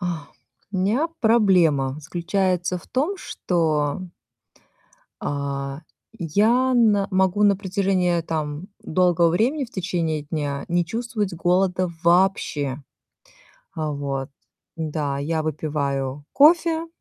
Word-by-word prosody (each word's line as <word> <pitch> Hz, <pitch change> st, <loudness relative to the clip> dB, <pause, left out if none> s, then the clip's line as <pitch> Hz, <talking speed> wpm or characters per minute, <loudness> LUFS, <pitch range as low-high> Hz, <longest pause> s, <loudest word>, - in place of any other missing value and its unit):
А, 170 Hz, -5 st, -3 dB, 0.5 s
у 190 Hz, -, -1 dB
меня 230 Hz, -, +1 dB
проблема 180 Hz, -, +3 dB
заключается 180 Hz, +2 st, -1 dB
в -, -, -17 dB
том, 300 Hz, +11 st, -1 dB
что 160 Hz, -, -1 dB, 1.2 s
а, 140 Hz, 0 st, -3 dB, 0.4 s
я 220 Hz, -, +2 dB
на 210 Hz, -5 st, +4 dB
могу 190 Hz, +1 st, +2 dB
на 205 Hz, -1 st, +5 dB
протяжении, 185 Hz, -3 st, 0 dB
там, 155 Hz, +1 st, -4 dB
долгого 175 Hz, 0 st, +3 dB
времени 250 Hz, -, +1 dB
в 240 Hz, -, -13 dB
течение 170 Hz, -6 st, -2 dB
дня 145 Hz, -2 st, -3 dB
не 175 Hz, 0 st, +1 dB
чувствовать 220 Hz, 0 st, -3 dB
голода 180 Hz, +1 st, +1 dB
вообще. 170 Hz, -6 st, +2 dB, 0.9 s
А 155 Hz, -1 st, -2 dB
вот, 140 Hz, -2 st, -3 dB, 0.5 s
да, 150 Hz, -3 st, -2 dB
я 155 Hz, +3 st, -1 dB
выпиваю 145 Hz, -3 st, -2 dB
кофе 325 Hz, +2 st, +4 dB
175 Hz, 105 wpm, -23 LUFS, 150-200 Hz, 1.2 s, на